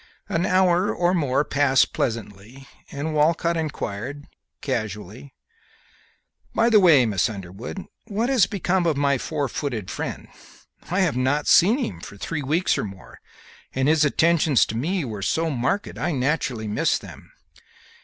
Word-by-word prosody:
An 170 +3 0
hour 185 +1 +3
or 175 +1 +1
more 145 -4 +1
passed 140 -2 +2
pleasantly, 115 +3 -4 0.2
and 155 +3 -4
Walcott 165 +3 +2
inquired, 145 -3 -4 0.3
casually, 110 0 -5 1.2
"By 235 +1 +3
the 215 - +7
way, 160 -9 +6
Miss 105 -1 +1
Underwood, 100 - -7 0.2
what 220 +2 -1
has 255 -8 +3
become 185 -3 0
of 155 -4 +1
my 140 -2 +2
four 145 0 -2
footed 120 -7 -4
friend? - - -5 0.6
I 185 +3 +1
have 175 -9 +1
not 130 +4 +1
seen 210 +8 +5
him 95 - -4
for 100 - -11
three 150 +8 -4
weeks 155 +7 +1
or - - -1
more, 95 -2 -10 0.6
and 130 +1 +1
his 155 0 +4
attentions 155 -2 +3
to 110 - -6
me 165 +7 -1
were 110 -4 -6
so 160 +10 0
marked 135 +10 -2
I 175 - -1
naturally 130 -4 -1
miss 105 - +1
them." - - -13
145 Hz, 150 wpm, -23 LUFS, 120-170 Hz, 1.2 s, the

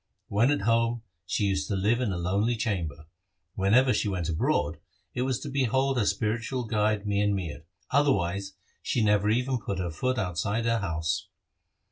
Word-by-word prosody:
When 110 +6 +3
at 145 - +1
home, 115 +2 +1 0.2
she 105 - 0
used 95 -7 0
to 100 - -1
dwell 115 +6 +2
in 115 -5 0
a 90 - -2
lonely 100 +7 +1
chamber. 85 -9 -3 0.5
When 100 +3 +2
ever 130 0 +5
she - - 0
went 90 -4 -2
abroad, 80 -1 0 0.3
it 125 - -2
was 130 -2 0
to - - -6
behold 135 0 +1
her 105 - +1
spiritual 115 +4 -1
guide 105 -1 +1
Mian 100 0 +1
Mir; 80 -5 -5 0.3
otherwise 100 -9 +1 0.3
she 115 - 0
never 105 0 +3
even 125 +3 +1
put 100 -3 -4
her 90 -2 -2
foot 130 +11 -1
outside 100 +3 -1
her 115 0 +2
house. 80 -4 -2
105 Hz, 175 wpm, -28 LUFS, 95-120 Hz, 0.5 s, ever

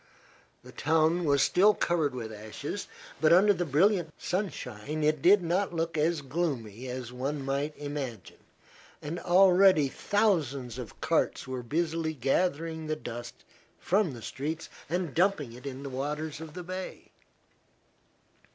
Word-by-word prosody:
The - - -12
town 160 +3 +2
was 140 -2 +4
still 205 +3 +5
covered 160 -6 0
with 110 -3 -5
ashes, 110 - -6 0.3
but 155 - +5
under 195 +4 +6
the 180 -2 -2
brilliant 170 +3 +3
sunshine 155 - -3
it 155 -1 +2
did 190 +3 +6
not 175 +2 0
look 165 0 -1
as 155 0 +1
gloomy 130 -6 -3
as 125 -1 -5
one 135 +2 -3
might 140 +2 -2
imagine, 140 - -6 0.6
and 160 +4 -5
already 185 -4 +5
thousands 140 - 0
of 120 -5 -8
carts - - 0
were 130 -1 -4
busily 160 +4 -1
gathering 160 +4 0
the 155 - 0
dust 120 -5 -8 0.3
from 190 -5 +1
the 115 - -10
streets 155 +4 -4 0.2
and 175 -4 -1
dumping 165 -9 +1
it 125 +3 -9
in 135 0 -6
the - - -5
waters 150 +4 -3
of 160 -2 -9
the 180 - -6
bay. 185 +1 -7
155 Hz, 140 wpm, -29 LUFS, 135-175 Hz, 0.6 s, under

